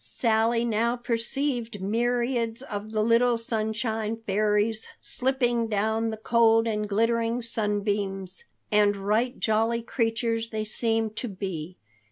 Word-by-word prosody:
Sally 230 0 +1
now 235 +1 +1
perceived 240 -1 -2
myriads 235 +3 0
of 210 -5 -5
the 215 -1 +1
little 235 +1 +4
Sunshine 220 0 -2
Fairies 210 +1 0
slipping 245 -3 0
down 220 +2 0
the 220 - -4
cold 225 0 +4
and 210 -2 -1
glittering 230 +3 +1
sunbeams, 205 - -1 0.3
and 205 -1 +4
right 215 +6 0
jolly 225 +2 +1
creatures 230 -1 -1
they 220 -1 -2
seemed 225 0 0
to 245 - -2
be. 185 -4 -5
225 Hz, 120 wpm, -26 LUFS, 210-235 Hz, 0.3 s, little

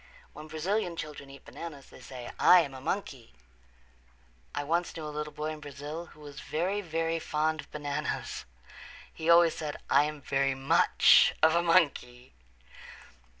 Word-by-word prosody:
When 155 - -10
Brazilian 175 +4 -2
children 150 -3 -7
eat 140 0 -14
bananas 150 -5 -9
they - - -14
say, 125 -1 -9
"I 180 -1 +7
am 140 -4 -5
a 130 - -9
monkey." 135 - -4 1.2
I 145 - -2
once 170 +4 -1
knew 160 - -6
a 150 - -6
little 150 0 -4
boy 155 +1 -4
in 155 - -7
Brazil 150 +3 -7
who 150 - -18
was 145 -1 -10
very, 185 +6 -2
very 165 -2 -2
fond 155 0 -1
of - - -20
bananas. 145 0 -4 0.7
He 160 +1 -4
always 170 -1 +6
said, 150 -2 -5
"I 140 +2 +5
am 150 0 -5
very 135 -1 0
much 135 0 +5
of 160 0 +6
a 170 - +3
monkey." 145 -8 +1
150 Hz, 160 wpm, -29 LUFS, 140-165 Hz, 1.2 s, I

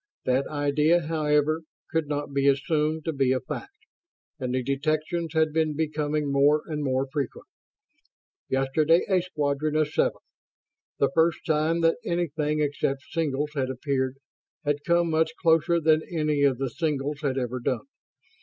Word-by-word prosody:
That 130 +2 +1
idea, 150 +3 +2
however, 155 0 +1 0.3
could 160 -3 0
not 145 -1 -3
be 140 0 +2
assumed 150 +3 +1
to 160 - -1
be 135 -2 +2
a 130 - +2
fact, 425 - -8 0.5
and 125 -2 -2
the 130 - 0
detections 155 +4 -1
had 160 -1 +2
been 155 -2 +1
becoming 150 -1 -1
more 145 +2 +4
and 150 -2 -3
more 130 -1 0
frequent. 140 -4 -3 1.0
Yesterday 150 +5 +2
a 185 -2 +3
squadron 150 -3 -1
of 155 -1 +2
seven - - +1 0.8
the 140 - +2
first 165 0 +2
time 160 +2 +1
that 165 0 +3
anything 155 -5 -1
except 140 -2 -1
singles 150 -3 -1
had 135 -3 -1
appeared 130 0 -2 0.5
had 145 0 0
come 170 -1 +3
much 160 0 +1
closer 165 0 +3
than 155 -1 +3
any 150 -3 0
of 140 -3 +3
the 135 -1 -2
singles 150 -1 -2
had 135 -3 -1
ever 125 -1 -2
done. 125 0 -2
150 Hz, 155 wpm, -26 LUFS, 140-160 Hz, 1.0 s, more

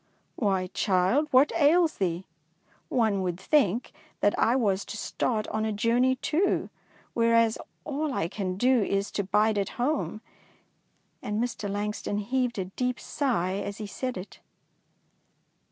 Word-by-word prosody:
'' - - -43
Why, 195 -4 +1
child, 195 +10 +2
what 265 +2 +5
ails 325 +1 +3
thee 180 -1 -1
I 165 +2 -39 0.2
One 220 -5 +2
would 180 -1 -2
think 235 - +2 0.3
that 205 - +4
I 235 - +3
was 200 -6 +1
to 225 - -6
start 215 0 -1
on 215 - -1
a 220 - 0
journey 235 +5 +2
too, 315 +8 0 0.4
whereas 230 -1 +3 0.3
all 300 0 -2
I 165 -10 -1
can 185 0 -3
do 250 +2 +4
is 200 0 -1
to 200 - -1
bide 210 +2 +2
at 195 - -3
home^'; 250 -4 -1 1.0
and 210 +1 -2
Mr. 230 -3 -2
Langston 205 0 -2
heaved 245 +3 -1
a 190 - -1
deep 250 +6 -2
sigh 195 - -1
as 200 0 -4
he 215 - -5
said 250 +3 -4
it. 185 +2 -9
215 Hz, 155 wpm, -27 LUFS, 195-255 Hz, 1.0 s, what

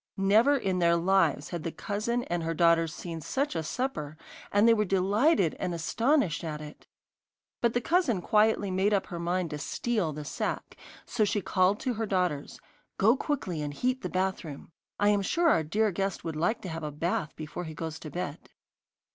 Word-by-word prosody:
Never 220 +9 +4
in 190 -7 -1
their 170 -1 +4
lives 170 -5 +2
had 175 - -4
the 165 +1 -3
cousin 230 +6 -2
and 175 -5 -2
her 165 0 -2
daughters 165 -1 +4
seen 165 +1 -6
such 275 - -2
a 165 - 0
supper, 155 - -3 0.3
and 205 +3 +4
they 230 - +7
were 210 -2 +2
delighted 195 - +2
and 180 -2 -2
astonished 225 - +1
at 155 -2 -4
it. 150 0 -11 0.7
But 235 -1 +2
the 245 - +2
cousin 320 - +2
quietly 210 +1 +2
made 195 +3 +2
up 195 - 0
her 175 -4 -6
mind 175 0 -1
to 150 - -4
steal 210 +1 -1
the 150 0 -7
sack, - - -3 0.3
so 225 - 0
she 205 0 +1
called 190 +1 +2
to 255 - -1
her 225 0 -3
daughters: 180 -7 -1 0.4
'Go 220 +5 +5
quickly 250 - -2
and 145 -1 -4
heat 255 - 0
the - - -3
bathroom: 185 -6 -3 0.3
I 205 0 +4
am 205 -1 +3
sure 335 - +2
our 165 - +4
dear 210 +7 +1
guest 195 +1 -2
would 165 -2 -4
like 175 +9 0
to 185 - -6
have 165 0 -5
a 150 - -2
bath 155 +1 -2
before 155 +3 -6
he 160 -1 -7
goes 160 0 -5
to 155 - -8
bed. 165 -2 -5
185 Hz, 195 wpm, -29 LUFS, 165-220 Hz, 0.7 s, they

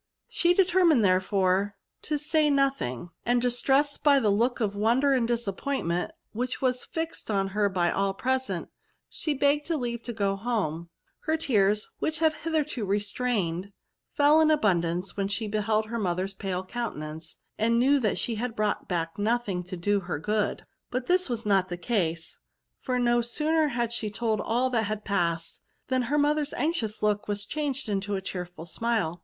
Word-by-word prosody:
She 350 0 +2
determined, 350 - +4
therefore, 190 +1 +2 0.3
to 300 - -1
say 300 +1 +2
nothing; 270 - 0
and, 245 +1 +2
distressed 270 +4 +1
by 285 -2 +6
the 215 -5 +2
look 235 +5 +1
of 205 -3 -1
won 225 +5 +2
der 280 0 +3
and 245 -3 +2
disappointment 230 - -1 0.2
which 250 +3 -3
was 255 -1 0
fixed 325 -6 -5
on 195 -2 +1
her 205 +1 +1
by 175 -2 +1
all 195 0 0
present, 260 +4 -1 0.4
she 305 -3 -2
begged 285 +3 +2
leave 240 -7 -2
to 240 - -5
go 200 -3 0
home. 195 -7 -2 0.4
Her 315 0 +1
tears, 210 -8 +2
which 315 - -1
she 325 - -3
had 315 -1 +4
hitherto 305 -6 -2
re 200 +1 +1
strained, 200 -4 -2 0.4
fell 295 +2 +5
in 315 - +4
abundance 180 - +1
when 195 -1 -1
she 215 +2 -2
beheld 215 +1 0
her 230 +2 -4
mother's 185 0 -1
pale 190 -1 -3
countenance, 160 -8 -5 0.2
and 230 +2 +3
knew 275 +4 +4
that 215 -5 0
she 230 - -1
brought 215 -2 -1
back 165 0 -2
nothing 215 -4 0
to 180 +1 -6
do 205 +4 +1
her 180 -2 -4
good. 210 +6 -1 0.2
But 250 0 -2
this 365 -1 +2
was 235 -2 -2
not 195 -2 +2
the 175 - -4
case; 175 -5 -2 0.4
for 255 -2 -1
no 240 -1 +3
^sooner 300 +6 +1
had 235 -2 -1
she 220 -2 -1
told 220 0 -1
all 250 +3 0
that 225 -3 +1
had 215 0 -4
passed, 170 -4 -1 0.3
than 260 -1 +2
her 295 - +2
mother's 295 0 +1
anxious 245 -11 -1
look 210 -1 +1
was 205 -1 -1
changed 285 -1 -2
into 200 0 -1
a 190 - -2
cheerful 180 -3 -6
smile. 180 -2 -1
220 Hz, 175 wpm, -27 LUFS, 195-265 Hz, 0.4 s, by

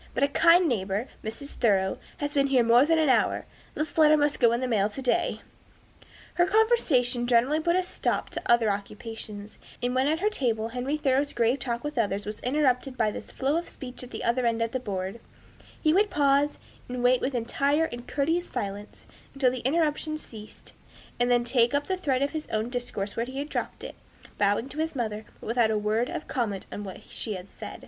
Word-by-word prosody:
But 265 - +1
a - - +5
kind 335 +4 +5
neighbor, 205 -1 -1 0.2
Mrs. 230 +6 -6
Thoreau, 195 -5 +1 0.2
has 290 0 -3
been 275 -1 +3
here 260 -3 +4
more 240 +4 +5
than 325 0 +3
an 315 -1 +3
hour. 260 - +2 0.3
This 305 - -3
letter 305 0 +7
must 290 0 +1
go 235 -2 +5
in 235 - +1
the 255 - -1
mail 210 -4 +2
to 215 - -8
day." 345 +8 0 0.9
Her 350 0 +3
conversation 325 - +3
generally 250 +6 +3
put 340 +2 +1
a 370 - +2
stop 360 - -2
to - - -4
other 230 -3 +4
occupations; 210 +1 -7 0.2
and 245 0 -1
when 260 +2 +2
at 310 +2 +2
her 415 +3 +2
table 230 - 0
Henry 255 +5 -2
Thoreau's 280 0 +1
grave 240 +3 +2
talk 235 -2 -3
with 295 -4 -3
others 205 -2 0
was 210 +1 -5
interrupted 260 -1 0
by 215 -1 +2
this - - -8
flow 275 +4 0
of 340 - -4
speech 250 -2 -8
at 250 - -9
the - - -6
other 240 +1 +1
end 230 0 +1
of 230 - -2
the 260 - -1
board, 195 -2 -4 0.6
he 310 -1 +3
would 410 +3 +3
pause, 285 0 +2 0.3
and 245 0 -3
wait 250 0 +4
with 265 0 -1
entire 280 +6 +1
and 240 -5 -7
courteous 325 +5 0
silence, 200 +1 -6 0.3
until 265 -2 +3
the 255 - -4
interruption 310 +3 0
ceased, 215 -7 -11 0.5
and 245 0 +2
then 240 -1 +3
take 240 +1 +2
up 285 0 0
the 375 - -1
thread 275 -8 0
of 280 - 0
his 310 -1 -5
own 220 +2 -1
discourse 225 -5 -3
where 230 +1 -2
he 260 +1 -7
had 285 +2 -3
dropped - - -4
it; - - -6 0.5
bowing 205 +4 +2
to 290 - -8
his 320 -1 -1
mother, 220 -4 -3
but - - -12
without 230 -1 +2
a 220 - +1
word 215 +4 0
of - - -5
comment 220 -7 -2
on 205 - -5
what 190 -2 -8
she 215 -3 -3
had 185 +1 -9
said. - - -8
250 Hz, 215 wpm, -27 LUFS, 225-290 Hz, 0.9 s, letter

